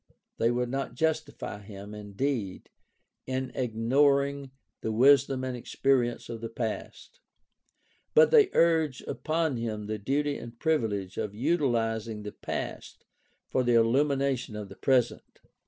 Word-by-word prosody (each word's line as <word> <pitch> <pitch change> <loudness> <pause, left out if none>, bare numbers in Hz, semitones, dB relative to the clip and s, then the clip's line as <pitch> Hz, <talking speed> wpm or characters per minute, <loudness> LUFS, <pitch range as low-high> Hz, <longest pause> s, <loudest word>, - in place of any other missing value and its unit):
They 115 - +3
would 120 0 0
not 135 -2 -3
justify 155 -8 -2
him, 100 0 -10
indeed, 105 0 -3 0.6
in 130 0 -2
ignoring 140 +4 +1 0.3
the 110 - -2
wisdom 135 +2 +4
and 130 -1 -3
experience 120 0 0
of 115 -2 -6
the 115 - -4
past; 115 - -5 1.0
but 475 0 +7
they 435 -5 +6
urge 160 -5 +3
upon 160 -4 -1
him 110 -2 -3
the 105 0 -3
duty 140 +6 -1
and 115 0 -10
privilege 110 - -1
of 105 -1 -3
utilizing 115 -6 0
the 105 - -6
past - - -6 0.4
for 130 - +1
the 120 -1 +3
illumination 135 0 +2
of 105 -2 -6
the 95 - -11
present. 130 -3 0
125 Hz, 130 wpm, -28 LUFS, 110-140 Hz, 1.0 s, but